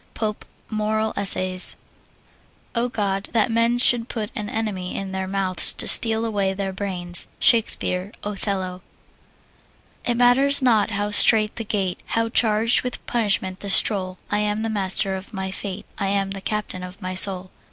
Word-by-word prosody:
POPE, 215 -2 -4 0.3
Moral 215 0 -1
Essays. 185 -2 +2 1.0
O 240 +1 -1
God, 200 -3 -3
that 230 -1 +1
men 230 +1 +1
should 245 -1 +4
put 215 -3 -5
an 210 -1 -5
enemy 205 -5 -4
in 195 -1 -5
their 190 0 -4
mouths 190 -1 +3
to - - -5
steal 225 0 +4
away 200 -3 -1
their 195 -1 -4
brains! 180 -3 -2
SHAKESPEARE, 200 -4 +2
Othello. 195 -3 -4 1.2
It 240 -2 -1
matters 265 +4 +4
not 230 -6 +2
how 205 -1 -3
strait 215 +1 +5
the 230 - -3
gate, 195 -4 -2 0.2
How 230 0 0
charged 225 0 +2
with 250 -1 -6
punishment 200 -5 -1
the 200 - -6
scroll, 185 -1 +4
I 205 - 0
am 210 +1 -2
the 225 - -2
master 195 -1 +1
of 190 +3 -9
my 190 0 -4
fate, 190 -1 -6
I 200 - -1
am 195 0 -1
the 195 0 -6
captain 210 -2 -4
of 180 +2 -10
my 185 -2 -5
soul. 185 0 +3
205 Hz, 165 wpm, -22 LUFS, 190-225 Hz, 1.2 s, strait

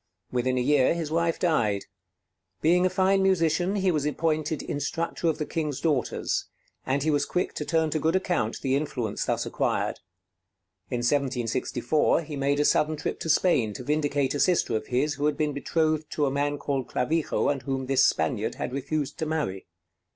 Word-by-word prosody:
Within 125 +1 0
a - - +2
year 140 +3 +3
his 160 -3 -3
wife 165 0 +1
died. 115 - +1 0.7
Being 180 +3 +4
a - - -1
fine 190 +1 +2
musician, 180 0 +2
he 190 -2 +2
was 150 -4 0
appointed 155 +1 -1
instructor 165 +4 -2
of 160 - +1
the 155 - -2
King's 150 -4 -3
daughters; 145 -7 0 0.4
and 135 +1 +1
he 155 - +2
was 145 -1 +2
quick 180 - -1
to 150 - -4
turn 160 -1 +1
to 155 - 0
good 160 +4 +1
account 175 - 0
the 135 -1 +2
influence 130 -7 -2
thus - - -1
acquired. - - -1 0.9
In 120 - -2
1764 130 +3 +1
he 150 -1 -7
made 140 +1 +1
a 145 - +3
sudden 155 +1 +3
trip 145 - -3
to 165 - -4
Spain 135 - +3
to 125 - -7
vindicate 145 -1 0
a 145 - -2
sister 175 -10 +2
of 110 - -3
his, 135 +4 +1
who 145 +1 0
had 150 -1 0
been 150 -2 0
betrothed 155 +1 0
to 150 - +1
a 135 - 0
man 145 +1 0
called 135 -3 -2
Clavijo 155 +5 0
and 140 -2 -1
whom 135 -1 -3
this 135 0 +3
Spaniard 100 +8 +1
had - - -4
refused 145 +2 -3
to 160 - -1
marry. 150 -12 -2
150 Hz, 190 wpm, -26 LUFS, 135-160 Hz, 0.9 s, Being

